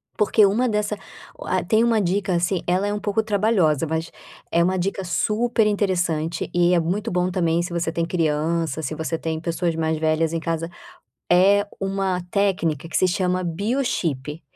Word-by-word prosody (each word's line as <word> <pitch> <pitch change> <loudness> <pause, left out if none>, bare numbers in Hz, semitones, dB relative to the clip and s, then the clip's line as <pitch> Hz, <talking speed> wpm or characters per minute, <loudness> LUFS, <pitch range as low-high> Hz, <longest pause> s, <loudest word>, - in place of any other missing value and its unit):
Porque 210 0 +4
uma 220 +6 +2
dessa 210 -1 -1 0.4
ah, 185 0 -1
tem 220 +5 +2
uma 230 -2 +3
dica, 195 +1 0
assim, 175 +1 0
ela 185 +3 +1
é 205 - -1
um 210 - -2
pouco 205 +1 0
trabalhosa, 200 -8 +2
mas 160 +1 -3 0.4
é 170 - +3
uma 185 +2 +1
dica 195 +2 -2
super 215 +5 +1
interessante 175 -6 -1
e 175 0 +3
é 175 - +4
muito 195 +7 -2
bom 180 0 +1
também 170 -2 +1
se 175 +1 -5
você 170 -1 -1
tem 170 0 -1
criança, 160 -2 -1
se 155 +1 -4
você 160 +1 -3
tem 160 -1 -3
pessoas 170 0 -1
mais 160 0 0
velhas 160 +1 +1
em 165 - 0
casa. 165 0 -3 0.6
É 200 +3 +5
uma 195 -1 -1
técnica 170 -7 0
que - - -1
se 185 - +3
chama 185 0 0
biochip, 170 - -2
180 Hz, 175 wpm, -22 LUFS, 165-200 Hz, 0.6 s, É